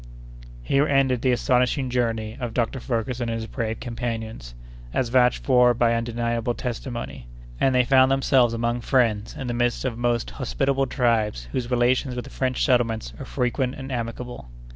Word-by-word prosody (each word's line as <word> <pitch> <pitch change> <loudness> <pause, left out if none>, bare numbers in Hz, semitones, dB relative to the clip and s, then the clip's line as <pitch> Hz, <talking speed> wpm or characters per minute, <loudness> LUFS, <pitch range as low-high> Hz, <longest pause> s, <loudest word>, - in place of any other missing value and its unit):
Here 140 - +2
ended 135 -3 +2
the 130 - +2
astonishing 125 +1 +1
journey 115 -3 -1
of 120 -3 -4
Dr. 125 +2 0
Ferguson 120 0 -2
and 115 - -1
his 115 0 -4
brave 115 -1 -3
companions, 115 - -5 0.4
as 125 - +1
vouched 125 0 +3
for 125 -2 +4
by 115 0 +3
undeniable 115 0 -1
testimony; 120 - -5 0.3
and 135 -1 +3
they 125 -1 +4
found 130 0 +5
themselves 130 -3 +3
among 120 +1 -1
friends 115 -5 +1
in 135 - -5
the 120 - -2
midst 120 +1 0
of 120 -3 -2
most 120 -1 0
hospitable 135 +1 0
tribes, 110 - 0
whose 120 -2 -2
relations 125 +1 +1
with 125 - -3
the - - -11
French 130 -1 0
settlements 115 - +1
are - - -6
frequent 125 +1 -1
and 135 0 -7
amicable. 120 - -5
120 Hz, 165 wpm, -24 LUFS, 115-130 Hz, 0.4 s, found